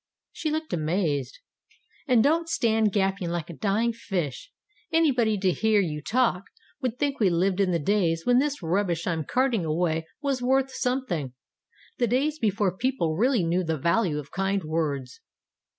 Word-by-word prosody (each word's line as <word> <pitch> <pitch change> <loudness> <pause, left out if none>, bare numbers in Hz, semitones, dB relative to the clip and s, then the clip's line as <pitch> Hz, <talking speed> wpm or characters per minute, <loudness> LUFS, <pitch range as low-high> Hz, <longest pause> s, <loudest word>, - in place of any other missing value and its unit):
She 315 - -3
looked 315 +1 -3
amazed. 155 -5 -1 0.7
"And 245 -4 +4
don't 330 +3 +2
stand 225 -7 +2
gaping 195 -2 0
like 170 0 -3
a - - -9
dying 220 +4 0
fish. 185 - -4 0.4
Any 325 -2 +4
body, 225 -4 +1
to 190 -1 +2
hear 220 +3 +2
you 155 -6 -1
talk, 220 - +1 0.4
would 250 -2 -2
think 285 0 -1
we 205 -4 +4
lived 180 +3 +1
in 195 -2 +3
the 175 - +2
days 165 -1 0
when 245 0 +4
this 285 -6 -1
rubbish 170 -1 0
I'm 165 -3 -1
carting 250 - +1
away 160 0 -1
was 275 -3 -1
worth 265 +1 +2
something 250 - -2 0.7
the 240 - +2
days 285 +6 0
before 200 -3 +1
people 240 -9 0
really 235 - +2
knew 175 +2 +1
the 160 -2 -1
value 170 +1 +1
of 145 -1 -7
kind 195 0 -1
words." 150 -5 -3
195 Hz, 165 wpm, -26 LUFS, 165-250 Hz, 0.7 s, And